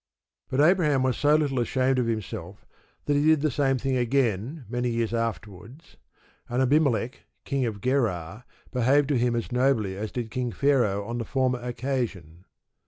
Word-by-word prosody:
But 130 - +1
Abraham 150 -5 +3
was 130 -2 +1
so 150 0 +3
little 145 -4 +1
ashamed 130 +2 +1
of 120 - 0
himself 100 -4 -5 0.4
that 145 - +1
he 145 - +2
did 155 -1 +4
the 155 -1 +1
same 135 0 +1
thing 130 0 -1
again, 125 - 0
many 120 +2 -1
years 115 -1 -1
afterwards, 115 - -5 0.5
and 120 +1 -1
Abimelech 130 -2 +1 0.2
King 135 -3 0
of 105 -3 -5
Gerar, 110 -6 -1 0.3
behaved 135 +3 +2
to 140 -4 +2
him 120 0 +1
as 115 +1 -3
nobly 125 -6 +1
as 105 +2 -5
did 120 -3 -4
King 125 -2 -2
Pharaoh 120 -8 +1
on 120 +2 -4
the - - -2
former 130 +1 0
occasion. 120 - -4
125 Hz, 170 wpm, -26 LUFS, 115-135 Hz, 0.5 s, did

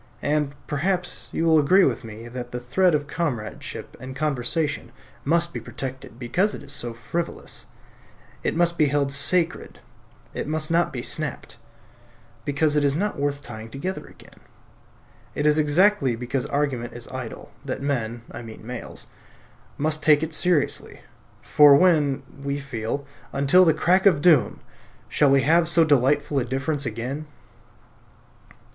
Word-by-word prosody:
And, 145 -1 0
perhaps, 175 +5 -2
you - - -1
will 160 -1 +5
agree 185 +7 +5
with 125 -4 +1
me 115 +1 -9
that 120 0 -7
the 125 - -4
thread 165 +8 +2
of 145 -1 -1
comradeship 140 -9 -4
and 130 0 -8
conversation 140 -1 -2 0.3
must 170 +3 +1
be - - -3
protected 130 -3 -7
because 180 - 0
it - - -10
is 140 0 -6
so 120 -4 -3
frivolous. 115 +9 -6 0.7
It - - -1
must 170 0 +1
be 155 - +5
held 140 0 0
sacred, 170 +5 +1 0.5
it - - -4
must 155 +1 -1
not 170 +1 +2
be 125 -2 -5
snapped, 155 -1 -5 0.9
because 145 +1 +1
it 150 - +3
is 140 -1 +2
not 200 -1 -2
worth 145 0 -1
tying 110 -2 -9
together 180 +10 -5
again. - - -17 1.0
It 145 - -1
is 150 +1 +4
exactly 155 - +3
because 125 +2 -3
argument 135 -5 -2
is 120 -1 -9
idle 130 -3 -7
that - - -4
men 120 -5 -2
(I 120 - -7
mean 110 -2 -11
males) 125 0 -6 0.7
must 155 +1 -1
take 150 -1 +4
it 160 0 -4
seriously; 170 -2 0 0.4
for 145 -1 +7
when 145 -5 +3 0.2
(we 140 +1 -2
feel), 140 0 -4 0.3
until 145 +7 +5
the 165 - +6
crack 185 +5 +3
of 170 -7 +4
doom, 160 0 +3 0.5
shall 145 - +3
we 135 0 +5
have 165 +3 +4
so 170 0 +5
delightful 145 0 +2
a - - 0
difference 135 +3 -2
again? 125 +7 -4
145 Hz, 150 wpm, -24 LUFS, 130-160 Hz, 1.0 s, for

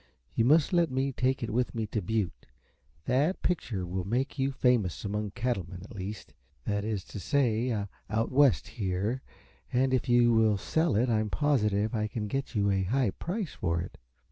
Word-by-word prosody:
You 115 - +2
must 150 +5 +4
let 170 -2 +4
me 130 +1 0
take 130 0 0
it 115 - -2
with 125 +1 0
me 110 -1 -1
to 105 0 -2
Butte. 105 0 -2 0.6
That 145 +9 +1
picture 115 - -1
will 90 +1 -3
make 125 +9 -2
you 135 +1 +1
famous 125 -9 +1
among 105 +1 -2
cattlemen, 95 -6 -3
at - - -11
least. 100 -2 -6 0.3
That 100 -1 -1
is 105 -3 -2
to - - -8
say, 120 +1 +1 0.4
out 110 +2 0
West, 140 -1 +4
here. 105 +4 -2 0.5
And 130 +1 +2
if 130 0 0
you 120 -1 +5
will 110 -2 +4
sell 160 - +1
it 120 +5 +3
I 115 -3 +2
am 110 -1 -1
positive 110 -6 +1
I 110 -2 0
can 105 0 -4
get 135 +3 -3
you 100 -1 +2
a 95 -1 +1
high 115 +3 +1
price 180 - -4
for 85 -2 -1
it." 85 - -7
115 Hz, 190 wpm, -29 LUFS, 100-130 Hz, 0.6 s, you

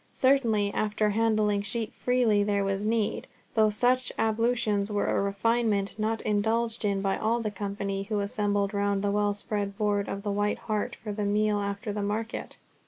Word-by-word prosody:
Certainly 230 -7 +2
after 210 0 0
handling 215 -2 +2
sheep 215 +2 -3
freely 240 -5 +2
there 200 -1 +1
was 195 +1 -1
need, 220 -1 0 0.3
though 215 -1 +4
such 245 +3 +1
ablutions 220 -2 +1
were 205 -1 0
a - - +1
refinement 205 0 0
not 220 +1 0
indulged 225 +2 0
in 200 -1 0
by 195 -1 0
all 230 +2 +1
the 215 -2 -2
company 200 -1 -3
who 210 +1 -2
assembled 205 -1 0
round 200 -1 0
the 200 - +1
well 205 0 +1
spread 200 -1 -3
board 205 -2 0
of 200 - -4
the 205 - -1
White 205 +1 0
Hart 215 -2 -2
for 215 - -7
the 210 0 -3
meal 210 +1 +1
after 200 +2 -3
the 205 - -2
market. 215 +3 -3
210 Hz, 175 wpm, -28 LUFS, 200-225 Hz, 0.3 s, though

